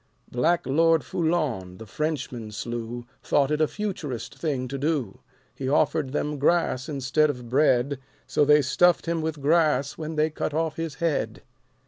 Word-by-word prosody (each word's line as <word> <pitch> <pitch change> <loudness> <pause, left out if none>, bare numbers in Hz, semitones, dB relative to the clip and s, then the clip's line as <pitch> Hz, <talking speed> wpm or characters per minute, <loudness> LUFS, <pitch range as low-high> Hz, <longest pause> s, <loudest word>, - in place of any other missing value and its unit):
Black 165 +8 +1
Lord 160 +3 +3
Foulon 135 - -1
the 110 - -9
Frenchman 130 -3 -3
slew 120 +2 -5 0.2
Thought 140 0 +2
it 150 +1 +1
a 155 - +4
Futurist 185 - -4
thing 135 -6 -2
to 135 +2 -5
do. 140 -8 -1 0.3
He 130 - -4
offered 150 -1 +1
them 150 0 -2
grass 150 -2 +1
instead 145 +2 +1
of 125 -4 -5
bread. 135 0 +2 0.3
So 150 - +2
they 150 0 +5
stuffed 175 +7 +3
him 165 -1 -1
with 155 -3 -4
grass 150 -3 +2
when 160 0 -4
they 155 +1 +2
cut 150 -1 -3
off 160 -1 0
his 165 -3 -4
head. 165 -1 -1
150 Hz, 160 wpm, -25 LUFS, 130-160 Hz, 0.3 s, they